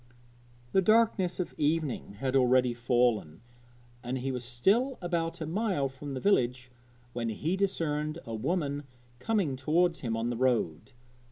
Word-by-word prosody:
The 190 Hz, -, +4 dB
darkness 210 Hz, -3 st, +3 dB
of 180 Hz, -, -3 dB
evening 150 Hz, -8 st, 0 dB
had 130 Hz, +5 st, -2 dB
already 125 Hz, -1 st, +4 dB
fallen, 120 Hz, -8 st, +1 dB, 0.6 s
and 125 Hz, +2 st, -3 dB
he 130 Hz, +1 st, -2 dB
was 125 Hz, -1 st, -4 dB
still 200 Hz, -, +1 dB
about 170 Hz, -2 st, -2 dB
a -, -, -1 dB
mile 175 Hz, -5 st, 0 dB
from 135 Hz, +1 st, -7 dB
the -, -, -3 dB
village 125 Hz, -8 st, +1 dB, 0.4 s
when 115 Hz, -1 st, -2 dB
he 155 Hz, -, -1 dB
discerned 155 Hz, -6 st, -1 dB
a 115 Hz, -, -6 dB
woman 145 Hz, +3 st, -1 dB, 0.3 s
coming 185 Hz, -, 0 dB
towards 165 Hz, +6 st, +1 dB
him 115 Hz, -3 st, -2 dB
on 115 Hz, +2 st, -1 dB
the 120 Hz, -, -3 dB
road. 120 Hz, -, 0 dB
135 Hz, 150 wpm, -29 LUFS, 125-175 Hz, 0.6 s, The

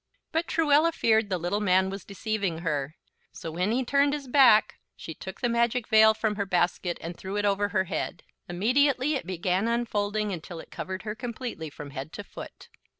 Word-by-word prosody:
But 325 Hz, +1 st, 0 dB
Truella 315 Hz, 0 st, +3 dB
feared 220 Hz, -6 st, +2 dB
the 185 Hz, -, 0 dB
little 175 Hz, +4 st, -1 dB
man 190 Hz, -2 st, +3 dB
was 195 Hz, -2 st, -6 dB
deceiving 200 Hz, -4 st, -3 dB
her; 150 Hz, -2 st, -2 dB, 0.4 s
so 165 Hz, -, -7 dB
when 180 Hz, +6 st, 0 dB
he 255 Hz, +2 st, 0 dB
turned 280 Hz, +3 st, +3 dB
his 290 Hz, -2 st, -4 dB
back 245 Hz, -5 st, +5 dB, 0.2 s
she -, -, -8 dB
took -, -, -9 dB
the 245 Hz, -, +2 dB
magic 235 Hz, 0 st, +1 dB
veil 220 Hz, 0 st, +6 dB
from 215 Hz, -2 st, -1 dB
her 200 Hz, -, -1 dB
basket 175 Hz, -1 st, 0 dB
and 170 Hz, +1 st, -6 dB
threw 190 Hz, +3 st, -6 dB
it 205 Hz, -, 0 dB
over 205 Hz, 0 st, +1 dB
her 195 Hz, -2 st, +1 dB
head. 180 Hz, -1 st, -4 dB, 0.3 s
Immediately 255 Hz, +9 st, +2 dB
it 265 Hz, -, -3 dB
began 185 Hz, +3 st, 0 dB
unfolding 215 Hz, -3 st, -1 dB
until 170 Hz, 0 st, -7 dB
it -, -, -12 dB
covered 185 Hz, 0 st, -5 dB
her 210 Hz, -1 st, -3 dB
completely, 235 Hz, -, -6 dB
from 145 Hz, 0 st, -9 dB
head 135 Hz, +4 st, -7 dB
to 205 Hz, -, -6 dB
foot. -, -, -11 dB
205 Hz, 195 wpm, -27 LUFS, 180-240 Hz, 0.4 s, veil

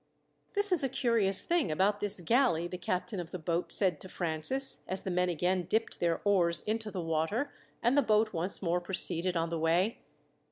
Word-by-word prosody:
"This 405 Hz, 0 st, +3 dB
is 350 Hz, -6 st, +4 dB
a 270 Hz, -, +1 dB
curious 225 Hz, -7 st, +2 dB
thing 340 Hz, -, +1 dB
about 200 Hz, +6 st, +1 dB
this 205 Hz, -2 st, -2 dB
galley," 175 Hz, -4 st, +2 dB
the 180 Hz, 0 st, -7 dB
captain 185 Hz, +2 st, -3 dB
of 170 Hz, -2 st, -6 dB
the 185 Hz, -, -5 dB
boat 170 Hz, +1 st, -2 dB
said 190 Hz, -3 st, +2 dB
to 185 Hz, -, -8 dB
Francis, 180 Hz, +13 st, 0 dB
as 190 Hz, +1 st, -3 dB
the 190 Hz, -, -3 dB
men 180 Hz, 0 st, +1 dB
again 180 Hz, +1 st, 0 dB
dipped 225 Hz, +2 st, -1 dB
their 170 Hz, -1 st, 0 dB
oars 175 Hz, -4 st, +2 dB
into 220 Hz, 0 st, -3 dB
the 195 Hz, -, -5 dB
water, 165 Hz, -, -1 dB, 0.3 s
and 240 Hz, +3 st, +3 dB
the 285 Hz, -, +5 dB
boat 215 Hz, -3 st, +2 dB
once 180 Hz, +4 st, -3 dB
more 175 Hz, 0 st, 0 dB
proceeded 180 Hz, -1 st, +1 dB
on 165 Hz, 0 st, -1 dB
the 165 Hz, -1 st, -3 dB
way. 170 Hz, +7 st, +1 dB
185 Hz, 200 wpm, -31 LUFS, 170-220 Hz, 0.3 s, the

